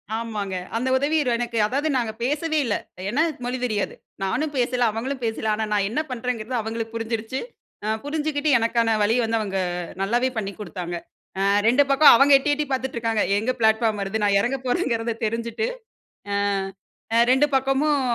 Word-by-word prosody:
ஆமாங்க. 215 -4 -3 0.2
அந்த 255 +3 -1
உதவி 290 +4 +1 0.2
எனக்கு, 235 -1 -3
அதாவது 280 +7 -1
நாங்க 230 -3 -1
பேசவே 305 +4 0
இல்ல. 215 -4 0 0.3
ஏனா 290 +8 +2 0.2
மொழி 250 +1 -2
தெரியாது. 210 -4 -2 0.3
நானும் 290 +10 -1
பேசல, 245 0 +1
அவங்களும் 255 +4 -4
பேசல 220 -1 -2
ஆனா 220 +1 -1
நான் 200 -1 +2
என்ன 240 +8 0
பண்றேங்கிறது 250 0 -3
அவங்களுக்கு 225 +1 -5
புரிஞ்சிடுச்சு 225 +2 -3 0.5
ஆ - - -2 0.2
புரிஞ்சுகிட்டு 300 0 -1
எனக்கான 230 0 +1
வழிய 215 +3 +3
வந்து 225 0 0
அவங்க 195 -3 -2 0.4
நல்லாவே 240 +6 +1
பண்ணிக் 200 -2 -4
குடுத்தாங்க. 180 -4 -5 0.4
ஆ - - 0 0.3
2 255 +5 +5
பக்கம் 275 +2 +8
அவங்க 275 +4 +5
எட்டி 280 +2 -2
எட்டி 300 +1 -1
பாத்துட்டு 265 -1 -2
இருக்காங்க, 225 -2 0 0.2
எங்க 225 +5 0
ப்ளாட்ஃபார்ம் 220 -1 +2
வருது? 200 +2 -2
நான் 200 -1 +4
எறங்க 255 +5 -1
போறேங்கிறத 235 -5 0
தெரிஞ்சுட்டு 230 - -2 0.7
ஆ - - 0 1.0
2 265 +3 +5
பக்கமும் 270 +2 +2
235 Hz, 160 wpm, -23 LUFS, 220-270 Hz, 1.0 s, பக்கம்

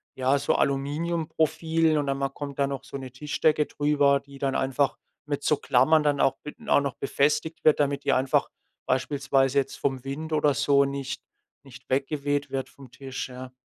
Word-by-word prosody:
ja, 130 +1 +2
so - - +1
Aluminiumprofilen 160 +2 0
und 145 -1 -1
dann 135 0 0
ma 135 0 0
kommt 140 0 -7
da 140 - +3
noch 135 -1 -5
so 140 - -7
'ne 130 -2 -8
Tischdecke 150 +3 +1
drüber, 145 -1 +2
die 140 0 -15
dann 135 -1 -1
einfach 135 +1 0 0.3
mit 145 -1 -3
so 150 - +3
Klammern 145 +4 +3
dann 145 -1 +1
auch 135 - +2
mit 150 - -8
auch - - +5
noch 140 -2 -3
befestigt 150 +4 0
wird, 155 - +5
damit 140 -1 0
die - - +3
einfach 130 +1 +2 0.4
beispielsweise 135 0 +1
jetzt 135 - -3
vom 135 -2 -2
Wind 155 +4 -5
oder 150 -2 +3
so 140 0 +3
nicht 135 -1 -4 0.4
nicht 125 -2 -15
weggeweht 145 +1 -1
wird 135 -1 -3
vom 135 -3 -15
Tisch, 135 0 -6
ja. 125 0 -9
140 Hz, 185 wpm, -26 LUFS, 135-150 Hz, 0.4 s, auch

